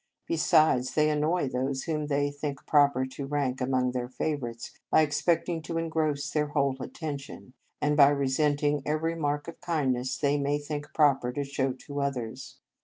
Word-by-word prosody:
Be - - -1
sides, 150 -4 +3
they 155 0 +3
annoy 150 +2 +1
those 130 +1 -2
whom 150 -2 -2
they 145 0 +1
think 145 -2 -5
proper 140 -3 +4
to 135 +1 -7
rank 135 -3 -1
among 125 -1 +1
their 125 -1 -3
favourites 125 -4 -4 0.2
by 155 - +5
expecting 160 +3 0
to 165 +1 -4
engross 160 -3 -1
their 150 -1 +1
whole 140 -2 +1
attention, 140 -3 -7 0.3
and 150 0 +1
by 140 -1 +7
resent 145 +1 +1
ing 145 0 +2
every 155 +3 -1
mark 145 -2 -2
of 170 - -9
kindness 130 -7 -1
they 145 0 +1
may 140 +1 +1
think 145 0 -5
proper 135 -5 +3
to 145 - -2
show 135 -1 -1
to 140 +2 -6
others. 130 -2 -4
145 Hz, 175 wpm, -28 LUFS, 135-150 Hz, 0.3 s, by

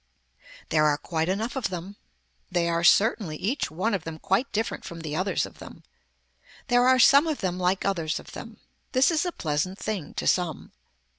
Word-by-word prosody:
There 155 -1 +3
are 145 -1 +2
quite 160 +1 -2
enough 220 +7 -2
of 265 - -1
them. 185 +2 -6 0.6
They 175 -2 +1
are 170 0 0
certainly 200 -2 +3
each 240 - -1
one 185 +8 -1
of 190 -5 -1
them 165 -1 -6
quite 195 - 0
different 220 +2 -2
from 165 -1 -8
the 155 -2 -4
others 185 +4 0
of - - -14
them. - - -12 0.9
There 245 0 +4
are 260 0 +5
some 280 +5 +6
of 310 -3 -2
them 180 -1 -2
like 185 +1 0
others 170 -5 -1
of - - -13
them. - - -9 0.4
This 260 +5 +4
is 330 +2 +1
a - - -1
pleasant 160 - -2
thing 205 -9 -5
to - - -3
some. 175 -5 0
185 Hz, 195 wpm, -26 LUFS, 165-230 Hz, 0.9 s, some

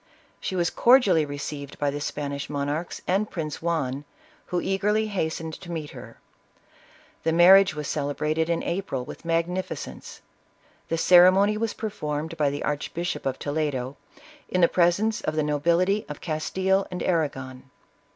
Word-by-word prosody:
She 190 - -4
was 175 -1 +1
cordially 235 - +5
received 145 0 -6
by 145 -1 0
the 145 +1 -5
Span 145 -1 -3
ish 140 -1 -5
monarchs 145 +3 -3
and 195 +4 +1
Prince 155 -4 -5
Juan, 145 -5 -1 0.4
who 180 - -1
eagerly 210 +4 +1
hastened 160 -4 -3
to 175 - -8
meet 155 -3 -5
her. - - -11 1.0
The 165 - +1
marriage 185 +1 +7
was 150 -1 -4
celebrated 150 +2 -1
in 170 - 0
April, 170 -8 -3
with - - -10
magnificence; 170 +3 -3 0.7
the 165 - 0
ceremony 185 +5 +6
was 225 0 -2
performed 160 -7 -4
by 150 -3 +2
the 145 +1 -4
Archbishop 155 +3 -3
of 135 0 -2
Toledo, 145 -3 -2 0.5
in 185 - +1
the 170 - +7
presence 185 +6 +2
of 155 - -2
the 155 - +1
no 150 0 -1
bility 180 +6 +1
of 150 - -6
Castile 190 +4 0
and 180 -1 -4
Arragon. 135 -6 -2
165 Hz, 150 wpm, -25 LUFS, 145-185 Hz, 1.0 s, marriage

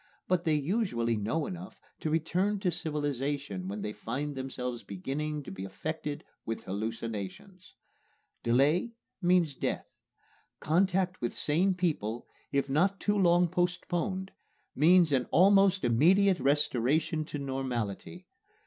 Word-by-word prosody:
But 180 -1 +1
they 160 -2 +3
usually 145 - 0
know 115 +9 -1
enough 185 0 -8 0.2
to 155 - -2
return 180 +6 +1
to 185 -3 +1
civilization 145 - -2
when 100 +1 -4
they 105 - -3
find 140 +8 -4
themselves 125 -2 -4
beginning 145 +10 -4
to - - -8
be 95 0 -6
affected 150 +9 -5 0.2
with 115 - -4
hallucinations. 110 - -5 0.7
Delay 145 - +2 0.3
means 175 -4 +3
death. - - -2 0.7
Contact 185 +2 +1
with 120 - -2
sane 180 +6 +2
people, 135 - -1 0.3
if 140 -1 +1
not 180 +8 +2
too 205 - +1
long 175 -2 +4
postponed, 180 +2 -1 0.4
means 170 +2 +5
an 130 -3 +1
almost 195 +1 +5
immediate 180 - +4
restoration 145 +2 +1
to 150 - -5
normality. 130 - -4
150 Hz, 120 wpm, -30 LUFS, 125-180 Hz, 0.7 s, means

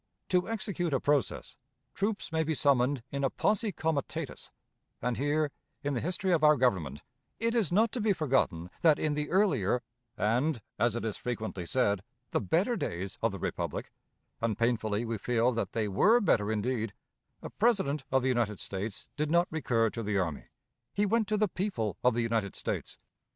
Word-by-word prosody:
To 180 +2 +2
execute 190 -8 -1
a - - +2
process, 145 0 0 0.4
troops 200 -1 -2
may 160 0 +1
be 160 0 -1
summoned 135 -2 +2
in 140 0 -2
a 135 - +3
posse 210 - +1
comitatus; 160 -5 -3 0.5
and 125 -1 -1
here, 145 +3 +1 0.3
in 145 0 0
the 120 - -1
history 185 +3 -1
of 165 -3 +3
our 150 0 +7
Government, 90 - 0 0.4
it 230 0 +1
is 225 - +1
not 215 +4 +4
to 245 - -3
be 215 0 +3
forgotten 130 - +1
that 160 -3 +6
in 155 -1 0
the 150 0 -2
earlier 140 - +2 0.3
and, 120 +7 +1 0.2
as 120 -1 +2
it 120 - -3
is 110 - -2
frequently 110 -7 -4
said, 100 -6 +1 0.3
the - - +1
better 175 - +1
days 95 - -4
of - - +2
the - - -5
republic - - -3 0.5
and 115 -3 0
painfully 115 -1 +1
we 115 -2 -3
feel 120 +2 +2
that 110 -4 -2
they 110 -2 0
were 210 - +5
better 110 - +2
indeed 110 0 -1 0.5
a - - -6
President 190 - +1
of 135 -1 +3
the - - +1
United 115 -5 0
States 100 +2 -4
did 150 0 0
not 170 +2 +4
recur 115 -8 +1
to 115 - -4
the 105 -2 -1
army; 85 -6 -2 0.5
he 205 - +3
went 220 +1 +2
to 215 +1 +1
the 210 0 +3
people 170 - -2
of 125 -2 +4
the 120 - +1
United 115 -4 -1
States. - - -4
130 Hz, 185 wpm, -30 LUFS, 110-175 Hz, 0.5 s, our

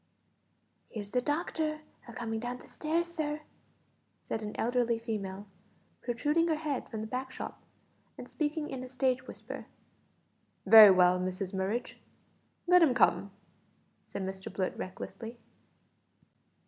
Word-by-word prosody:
"Here's 205 -3 -6
the 250 - +2
doctor 305 +1 -1 0.3
a 235 - -9
comin' 225 -1 -3
down 245 +2 -5
stairs, 330 +3 -1
sir," 305 -3 -3 0.8
said 225 - -4
an 210 -1 -5
elderly 240 0 +1
female, 205 -3 -4 0.6
protruding 295 +8 +1
her 320 - +2
head 300 -4 -3
from 220 -2 -4
the - - -3
back 255 +3 -3
shop, - - -7 0.6
and - - -8
speaking 300 0 -2
in 260 -1 -4
a 255 - -8
stage 255 0 0
whisper. - - -8 1.0
"Very 215 +1 +11
well, 180 -1 +5
Mrs 185 +1 -3
Murridge, 195 +6 -2 0.7
let 360 0 +6
him 285 -7 +5
come," 195 -4 +3 0.7
said 200 - -6
Mr 190 0 -5
Blurt 185 -2 -2
recklessly. 225 +5 -7
240 Hz, 130 wpm, -31 LUFS, 205-295 Hz, 1.0 s, Very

